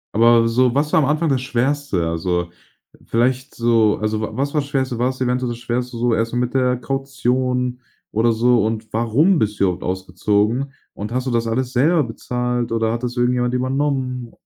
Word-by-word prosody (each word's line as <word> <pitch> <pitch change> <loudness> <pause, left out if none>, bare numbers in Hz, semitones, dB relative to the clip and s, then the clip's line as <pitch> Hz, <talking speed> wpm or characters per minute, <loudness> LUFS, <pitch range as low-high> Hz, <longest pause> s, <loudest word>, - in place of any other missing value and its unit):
Aber 115 +1 +5
so 125 +1 +2
was 150 +2 0
war - - +6
am - - +2
Anfang 155 +2 +1
das 135 -4 +1
Schwerste? 130 - -1
Also, 85 +1 -1 0.6
vielleicht 130 +4 0
so 115 -2 +2
also 110 0 -2
wa 110 - -2
was 140 +5 -2
war 150 - +2
das 140 - -9
Schwerste? 130 -3 -1
War 125 +2 +1
es 130 - -6
eventuell 125 -1 0
das 120 - -5
Schwerste 125 0 -3
so 120 0 +1
erstmal 115 +2 -1
mit 125 0 -1
der 125 -1 +2
Kaution 130 -1 -1 0.3
oder 115 +2 +2
so 120 0 +3
und 110 0 -4
warum 135 - +3
bist 105 -1 -1
du - - +4
überhaupt 90 -2 -2
ausgezogen 105 +7 0 0.2
und 105 +2 -6
hast 130 +1 -2
du 130 - 0
das 115 -1 0
alles 125 +3 -1
selber 155 +6 +3
bezahlt 125 +1 -3
oder 115 0 0
hat 120 - -4
das 125 0 -3
irgendjemand 125 0 +1
übernommen? 130 -2 -1
125 Hz, 195 wpm, -20 LUFS, 115-130 Hz, 0.6 s, war